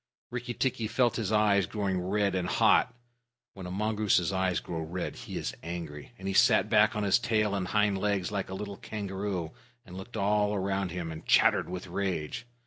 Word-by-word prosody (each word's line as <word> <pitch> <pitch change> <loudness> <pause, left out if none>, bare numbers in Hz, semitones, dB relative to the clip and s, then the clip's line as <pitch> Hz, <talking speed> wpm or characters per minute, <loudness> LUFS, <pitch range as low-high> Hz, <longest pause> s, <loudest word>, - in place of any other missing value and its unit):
Rikki 120 0 -4
tikki 120 -4 0
felt 120 +1 +1
his 110 -3 -2
eyes 105 -4 +3
growing 95 -3 -1
red 100 +1 0
and 90 -1 -1
hot 125 - +3 0.6
(when 95 -2 -8
a - - -6
mongoose's 105 -3 +1
eyes 95 -1 +1
grow 85 - -5
red, 85 +3 -4
he - - -7
is - - -3
angry), 85 -2 -7
and 95 - -7
he 95 - -1
sat - - +4
back 105 +1 +5
on 105 - -1
his 100 +3 +4
tail 110 -3 +1
and 95 -2 -1
hind 105 0 +2
legs 100 -2 0
like 100 -3 -3
a 95 - -5
little 100 0 -6
kangaroo, 95 -5 -4 0.3
and 90 -3 -11
looked 100 +5 -8
all 105 0 +2
round 95 0 -1
him, 85 -2 -4
and 80 0 -9
chattered - - +4
with 90 0 -5
rage. 95 +3 -3
100 Hz, 195 wpm, -29 LUFS, 90-105 Hz, 0.6 s, back